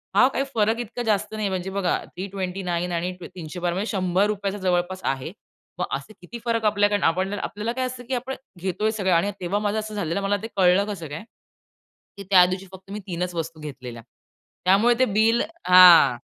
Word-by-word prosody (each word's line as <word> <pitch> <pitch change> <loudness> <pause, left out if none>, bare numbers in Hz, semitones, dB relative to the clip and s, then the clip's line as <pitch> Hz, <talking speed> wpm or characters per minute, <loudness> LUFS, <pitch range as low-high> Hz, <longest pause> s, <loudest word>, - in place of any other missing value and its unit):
हां, 255 - +6
काही 275 - -1
फरक 220 +1 +2
इतका 240 +1 -5
जास्त 210 +1 0
नाही 215 -2 -1
म्हणजे 185 0 -3
बघा 195 -2 0
329 180 -2 -4
आणि 175 +1 -1
ती - - -7
312 175 +1 -4
म्हणजे 200 +4 -2
₹100चा 195 +1 0
जवळपास 185 -1 -1
आहे. 135 -1 -2 0.5
मग - - 0
असे 140 +10 -13
किती 235 +7 -9
फरक 230 -2 0
आपल्याकड 205 -1 +2
आपणने 190 +4 +1
आपल्याला 210 +3 -3
काय 255 +1 -1
असतं 255 -1 -6
की 265 - -3
आपण 255 +2 -4 0.3
घेतोय 190 +4 -1
सगळं 195 -4 0
आणि 175 +5 +2
तेव्हा 185 +3 -1
माझं 210 +1 -1
असं 215 0 -6
झालेलं 175 -1 -2
मला 200 +1 +1
ते - - -3
कळलं 185 +1 +4
कसं 170 -5 -7
काय? 150 +7 -6 0.9
की 200 - -7
त्या 180 -2 +8
दिवशी 185 +1 -3
फक्त 190 +1 -13
मी 210 - -4
तीनच 180 0 -3
वस्तू 165 -1 -4
घेतलेल्या. 130 -6 -8 0.6
त्यामुळे 205 +6 +4
ते 260 - +5
बिल 220 +2 +2 0.3
हां. 180 -9 +8
195 Hz, 185 wpm, -24 LUFS, 180-210 Hz, 0.9 s, त्या